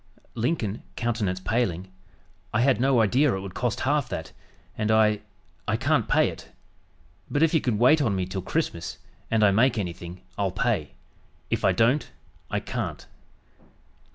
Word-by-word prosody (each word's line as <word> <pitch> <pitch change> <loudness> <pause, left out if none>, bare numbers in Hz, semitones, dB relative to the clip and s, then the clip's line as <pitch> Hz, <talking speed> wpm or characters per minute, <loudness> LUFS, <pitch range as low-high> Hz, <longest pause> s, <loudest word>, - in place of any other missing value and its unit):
Lincoln 115 -4 -1
(countenance 110 -6 -1
paling) 95 -4 -1 0.6
"I 110 - +3
had 130 -1 +3
no 130 -3 +4
idea 125 +4 +3
it - - -3
would 95 -1 -7
cost 120 -3 -1
half 145 -2 +1
that, 80 - -5 0.4
and 110 - -1
I 110 -1 +4 0.5
I - - +1
can't - - +1
pay - - +3
it; - - -10 0.8
but 145 - +2
if 165 - +3
you 160 - +3
can 120 -4 0
wait 130 +7 +5
on 110 -8 +1
me 95 -1 -1
till 95 +1 -4
Christmas, 90 - -2 0.3
and 110 -1 +2
I 100 - +6
make 115 +4 +3
anything, 90 -2 -5 0.2
I'll 100 -1 +2
pay; 100 -5 -1 0.6
if - - 0
I - - +5
don't, 125 +6 +2 0.4
I - - 0
can't." - - -4
110 Hz, 160 wpm, -26 LUFS, 95-125 Hz, 0.8 s, I